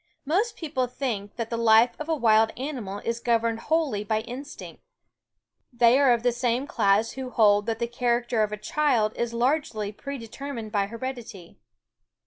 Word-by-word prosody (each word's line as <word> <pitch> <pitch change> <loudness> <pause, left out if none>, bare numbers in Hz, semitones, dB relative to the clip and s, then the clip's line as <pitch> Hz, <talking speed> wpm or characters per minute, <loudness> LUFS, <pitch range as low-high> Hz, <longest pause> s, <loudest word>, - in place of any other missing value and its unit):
Most 405 - 0
people 275 -6 -2
think 235 -6 -4
that 230 -1 -4
the 230 - -1
life 230 +1 +5
of 305 +1 -6
a 320 - +2
wild 220 -4 +4
animal 250 -8 -5
is 230 0 -1
governed 230 -1 +1
wholly 295 -7 0
by 215 +1 0
instinct. 255 +5 -9 0.9
They 240 +1 +4
are 275 -3 +5
of 235 -1 +1
the 245 - +3
same 245 +2 -1
class 215 -4 +2
who 260 -1 -6
hold 210 -3 +3
that 225 -1 -1
the 235 - -1
character 240 -1 0
of 210 0 0
a 210 - -4
child 235 -3 +1
is 235 -1 -2
largely 235 -4 -1
predetermined 240 -1 -7
by 200 -2 0
heredity. 230 -5 -8
235 Hz, 165 wpm, -26 LUFS, 220-260 Hz, 0.9 s, life